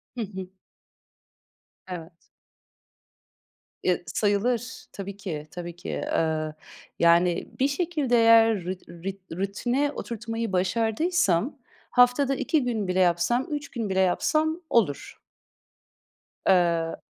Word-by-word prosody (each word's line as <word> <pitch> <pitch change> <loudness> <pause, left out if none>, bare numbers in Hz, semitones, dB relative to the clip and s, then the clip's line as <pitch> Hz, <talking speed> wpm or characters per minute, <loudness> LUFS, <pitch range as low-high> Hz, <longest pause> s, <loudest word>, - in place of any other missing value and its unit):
Hı 240 - -3
hı. 190 -3 -5 1.4
Evet. 175 -2 -7 1.7
Ya, 180 - +3
sayılır. 215 +7 -1
Tabii 200 0 -7
ki, 160 -7 -5
tabii 175 -1 -7
ki. 175 - -8
Eee, 155 -1 -1 0.5
yani, 170 +1 +4
bir 265 - +4
şekilde 295 -4 0
eğer 225 -3 +5
ru 180 - -2 0.2
ru 185 0 -7
rutine 240 +9 0
oturtmayı 230 -4 -4
başardıysam, 220 - +1 0.3
haftada 250 +3 +4
2 300 +2 +1
gün 225 -5 -1
bile 180 +1 0
yapsam, 180 +8 +2
3 290 -1 -4
gün 230 -4 -3
bile 190 0 +1
yapsam 310 - +1
olur. 195 -12 +1 1.3
Eee 170 -3 +2
200 Hz, 105 wpm, -26 LUFS, 175-245 Hz, 1.7 s, eğer